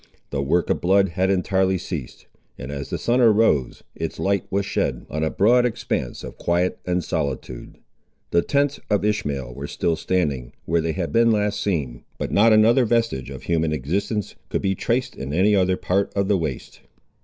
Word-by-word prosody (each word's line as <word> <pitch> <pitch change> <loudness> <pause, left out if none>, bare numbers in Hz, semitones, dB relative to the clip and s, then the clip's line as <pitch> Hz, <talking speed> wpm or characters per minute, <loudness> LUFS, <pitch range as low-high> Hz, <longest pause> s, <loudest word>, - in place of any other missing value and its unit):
The 70 - -1
work 80 +5 +1
of - - -1
blood 95 +2 +3
had 95 +3 0
entirely 95 0 +1
ceased; 80 -8 -6 0.3
and 70 - -7
as 70 -1 -5
the - - -2
sun 120 +2 +1
arose, 110 - +3
its - - -5
light 100 0 0
was 100 0 0
shed - - -2
on 75 +1 -2
a 80 - +1
broad 120 +8 +4
expanse 110 - -2
of - - -9
quiet 90 +1 0
and 90 0 0
solitude. 70 -6 -4 0.5
The 85 - +4
tents 145 +4 0
of 105 -1 +1
Ishmael 70 -12 -2
were - - -6
still 85 - 0
standing, 75 -9 -1
where 85 +1 +1
they 80 0 -1
had 90 -3 -3
been 115 0 +4
last 105 -1 0
seen, 70 -11 -2
but - - -4
not 110 +3 +5
another 110 +4 +5
vestige 115 - 0
of 65 -2 -8
human 80 -2 0
existence 95 - -2 0.2
could - - -2
be 95 - +2
traced 120 +6 -1
in 70 +2 -5
any 100 +4 +4
other 95 -1 +2
part 95 +2 0
of 100 -1 +1
the 100 -1 +3
waste. 75 -6 -5
95 Hz, 190 wpm, -23 LUFS, 75-105 Hz, 0.5 s, not